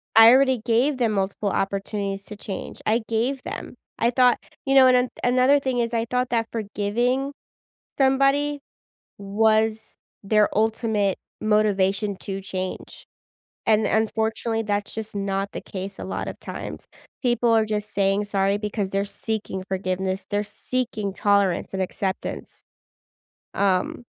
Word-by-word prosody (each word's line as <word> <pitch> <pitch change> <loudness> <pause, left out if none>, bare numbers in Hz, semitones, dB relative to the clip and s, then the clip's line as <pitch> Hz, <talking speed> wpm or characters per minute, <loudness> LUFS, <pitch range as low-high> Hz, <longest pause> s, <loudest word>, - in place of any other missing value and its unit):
I 225 +1 +10
already 260 -3 +4
gave 255 +5 +2
them 230 -3 +1
multiple 200 +1 -1
opportunities 195 0 -2
to 210 - -8
change. 200 -1 -7
I 225 +2 +2
gave 250 +4 0
them. - - -7 0.2
I 235 +1 +2
thought 250 -1 +4 0.3
you 270 0 +2
know, 265 -1 +8
and 255 - +6
an 250 0 +1
another 255 +3 +4
thing 260 -3 -1
is 235 0 -1
I 230 0 +1
thought 250 0 0
that 230 -1 0
forgiving 235 +6 -1 0.7
somebody 275 +2 +3 0.6
was 215 +2 +2 0.5
their 210 0 +4
ultimate 215 -2 +1 0.2
motivation 205 -2 +1
to 195 -1 -4
change, 185 -1 -6 0.6
and 215 -1 +4
unfortunately, 220 +1 0
that's 205 -1 -2
just 220 -1 -6
not 195 0 -1
the - - -5
case 195 0 -7
a - - -5
lot 190 - -4
of - - -7
times. - - -7 0.4
People 240 -1 +2
are 220 - +4
just 210 0 -3
saying 195 +1 +2
sorry 200 0 +1
because 210 -2 -3
they're 195 +1 0
seeking 205 -3 -4
forgiveness. 190 0 -2
They're 205 0 0
seeking 210 -1 -3
tolerance 200 -4 +2
and 190 - -2
acceptance. 190 +1 -4 0.9
Um, 195 +3 0
215 Hz, 140 wpm, -24 LUFS, 200-240 Hz, 0.9 s, I